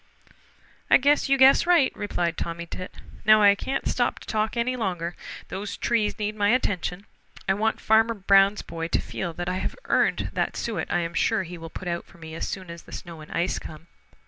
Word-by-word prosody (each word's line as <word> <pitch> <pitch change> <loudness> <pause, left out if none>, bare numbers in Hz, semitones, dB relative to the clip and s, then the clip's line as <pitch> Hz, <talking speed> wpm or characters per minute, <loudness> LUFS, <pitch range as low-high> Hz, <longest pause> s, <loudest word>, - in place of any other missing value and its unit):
"I - - +8
guess 285 +1 +2
you 275 - +4
guess 270 +5 +6
right," 340 -7 +4
replied 175 -5 -2
Tommy 170 0 -4
Tit. 185 +2 -8 0.3
"Now 215 0 +6
I 200 0 +8
can't 260 +6 -3
stop - - 0
to - - -13
talk 220 +1 -1
any 245 +2 0
longer. 180 -7 -3 0.3
These 200 +1 -5
trees 225 -3 0
need 210 -1 -2
my 205 -1 +2
attention. 200 -5 0 0.4
I 190 - +4
want 220 +3 0
Farmer 225 +1 +3
Brown's 195 0 +4
boy 165 0 -5
to - - +1
feel 175 - -4
that 175 +1 -5
I 180 +1 -1
have - - -3
earned - - +1
that - - -1
suet 210 -9 -3
I 175 - +2
am 170 0 -4
sure 220 +4 +1
he 175 0 -9
will 165 0 -8
put 180 - -8
out 170 0 -3
for 195 - -18
me 160 -1 -10
as 165 - -4
soon 185 -3 -6
as 170 0 -9
the - - -17
snow 170 -2 -8
and 155 - -12
ice 175 +2 -1
come. 155 +1 -10
195 Hz, 215 wpm, -25 LUFS, 170-220 Hz, 0.4 s, I